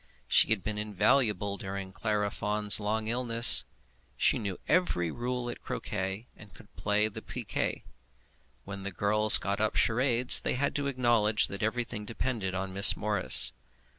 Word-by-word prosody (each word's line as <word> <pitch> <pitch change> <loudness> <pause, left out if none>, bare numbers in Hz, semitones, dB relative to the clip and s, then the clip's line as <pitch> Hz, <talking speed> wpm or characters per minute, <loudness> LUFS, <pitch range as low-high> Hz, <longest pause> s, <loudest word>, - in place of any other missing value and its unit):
She - - +4
had 110 -4 -1
been 105 -1 -5
invaluable 105 -1 -1
during 95 -1 -8
Clara 105 0 -3
Fawn's 105 0 +1
long 110 +1 -3
illness. 115 0 +2 0.5
She - - +1
knew 100 -4 -6
every 90 - -1
rule 125 0 -5
at 120 - -8
croquet, 95 +5 -6
and 105 -2 -17
could 105 +2 -20
play 105 +1 -1
piquet. 110 - -6 0.8
When 100 0 -9
the 100 - -6
girls 105 +3 +5
got 100 +1 -4
up 110 - -2
charades 125 +1 +4
they - - -4
had 140 +3 -2
to 140 -1 -4
acknowledge 120 -5 +1
that 100 +2 -7
everything 110 0 -4
depended 110 -4 -5
on 95 0 -5
Miss 100 +2 +7
Morris. 105 -3 +4
105 Hz, 150 wpm, -27 LUFS, 100-120 Hz, 0.8 s, Miss